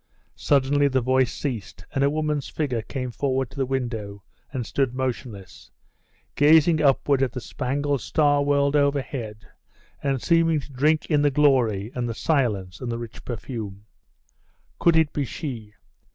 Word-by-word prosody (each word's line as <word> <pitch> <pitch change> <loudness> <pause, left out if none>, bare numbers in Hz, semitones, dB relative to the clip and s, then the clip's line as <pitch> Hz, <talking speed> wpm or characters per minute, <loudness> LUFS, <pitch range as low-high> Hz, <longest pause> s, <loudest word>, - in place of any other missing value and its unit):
Suddenly 145 0 +2
the 130 -1 +1
voice 130 0 +2
ceased, 120 -9 -5
and 135 - +1
a 140 - +4
woman's 150 -1 -2
figure 130 -7 -2
came 125 +2 -5
forward 130 0 -1
to - - -14
the 135 -2 0
window, 115 -6 -4 0.3
and 125 -4 -3
stood 130 +1 -1
motionless, 120 -7 -5 0.6
gazing 155 +2 +5
upward 140 -1 +3
at 130 -3 0
the 125 - -4
spangled 140 +3 -2
star 145 +1 +2
world 140 0 +2
overhead, 135 -7 -1 0.6
and 135 -2 0
seeming 165 +1 +3
to 140 0 -11
drink 150 +4 +2
in 150 -1 +4
the 145 - +4
glory, 125 -8 +2
and 120 -1 -2
the 115 - -4
silence, 105 - -1
and 125 -2 -3
the 115 - -2
rich 115 -1 -9
perfume.... 110 -4 -6 0.9
Could 170 -1 +4
it 160 -2 +3
be 145 - -1
she? 115 -6 -6
135 Hz, 155 wpm, -24 LUFS, 120-145 Hz, 0.9 s, gazing